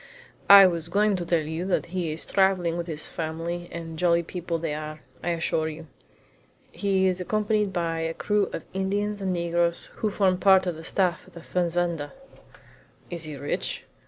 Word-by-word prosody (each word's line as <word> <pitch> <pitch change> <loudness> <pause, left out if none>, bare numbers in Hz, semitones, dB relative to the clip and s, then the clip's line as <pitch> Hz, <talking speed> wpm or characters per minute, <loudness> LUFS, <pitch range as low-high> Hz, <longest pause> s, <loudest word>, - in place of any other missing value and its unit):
"I 200 -1 +11
was 170 -2 0
going 205 +2 +2
to 175 - -4
tell 170 -2 +2
you 160 +3 -3
that 190 - +1
he 175 -4 -1
is 155 - -3
traveling 190 -3 +2
with 170 0 -4
all - - -2
his 150 - +2
family 170 +2 -4
and 165 -1 -7
jolly 170 -1 +3
people 170 0 -4
they 160 -2 -3
are, 155 0 -6 0.2
I - - -1
assure 160 -1 0
you. 160 +1 -9 0.9
He 195 -2 +1
is 185 -1 +1
accompanied 210 +1 0
by 170 -3 -1
a 165 0 -2
crew 210 -1 +1
of - - -6
Indians 200 +2 -1
and 190 -1 -1
negroes, 170 -1 0
who 215 - 0
form 190 -3 +1
part 190 -1 +5
of 175 -2 -2
the 160 - -10
staff 175 -1 0
at - - -18
the 170 - -11
fazenda." 170 -4 -1 1.0
"Is 170 -2 -4
he 150 -2 -7
rich?" 145 +1 -2
175 Hz, 190 wpm, -26 LUFS, 165-190 Hz, 1.0 s, I